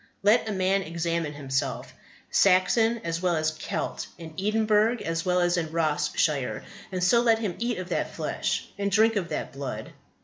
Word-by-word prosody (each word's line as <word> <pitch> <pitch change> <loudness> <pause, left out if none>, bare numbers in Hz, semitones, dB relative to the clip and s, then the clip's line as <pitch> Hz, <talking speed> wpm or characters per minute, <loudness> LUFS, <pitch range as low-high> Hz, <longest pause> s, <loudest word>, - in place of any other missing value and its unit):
Let 220 +2 +4
a - - -1
man 190 0 +1
examine 170 -2 -2
himself, 135 -1 -3 0.4
Saxon 225 +5 +3
as 165 0 -2
well 180 -2 +2
as 155 0 +1
Celt, 155 - -4
in 160 -2 -9
Edinburgh 215 +2 +2
as 165 0 -2
well 180 0 +3
as 175 0 +2
in 160 -2 -2
Ross 150 -2 0
shire, 140 -5 0 0.3
and 185 -1 -2
so 235 +6 +5
let 230 -2 +4
him 215 -5 -2
eat 240 0 -1
of 185 0 -6
that - - -1
flesh - - -2
and 200 0 0
drink 220 +3 +4
of 185 -4 -1
that - - -3
blood. 135 -1 -6
180 Hz, 180 wpm, -26 LUFS, 160-215 Hz, 0.4 s, so